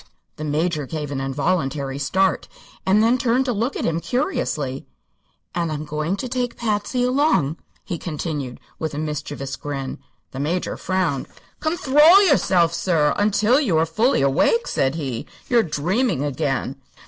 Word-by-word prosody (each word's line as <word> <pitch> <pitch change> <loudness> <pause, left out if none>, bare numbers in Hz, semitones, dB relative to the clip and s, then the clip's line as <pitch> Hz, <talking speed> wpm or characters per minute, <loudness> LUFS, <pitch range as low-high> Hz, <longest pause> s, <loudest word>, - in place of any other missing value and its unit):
The 155 - -6
Major 155 0 -1
gave 150 -2 -4
an 135 -1 -2
involuntary 135 -1 -1
start, 190 +8 +1 0.4
and 205 +3 +4
then 240 +3 +3
turned 250 +2 +2
to 250 - 0
look 230 +6 -1
at - - -2
him 165 0 0
curiously. 165 - -2 0.7
"And 170 -2 -1
I'm 150 0 -4
going 155 +4 -2
to 255 - -4
take 250 -1 -2
Patsy 225 +2 -1
along," 250 - +2 0.3
he 175 -4 -4
continued, 150 -6 -4 0.2
with 160 -2 -3
a - - -4
mischievous 145 -3 -4
grin. 135 -2 -5 0.3
The 135 - -7
Major 165 +6 -1
frowned. 180 -8 -1 0.3
"Conthrol 315 +3 +5
yourself, 180 - +3
sir, 165 -4 +2
until 215 +5 +3
you 195 - +1
are 160 - +3
fully 220 - +2
awake," 145 - +3
said 135 +2 0
he. 135 -8 -4 0.2
"You're 240 -2 +4
dreaming 175 - 0
again." 135 -2 -2
165 Hz, 150 wpm, -22 LUFS, 145-230 Hz, 0.7 s, Conthrol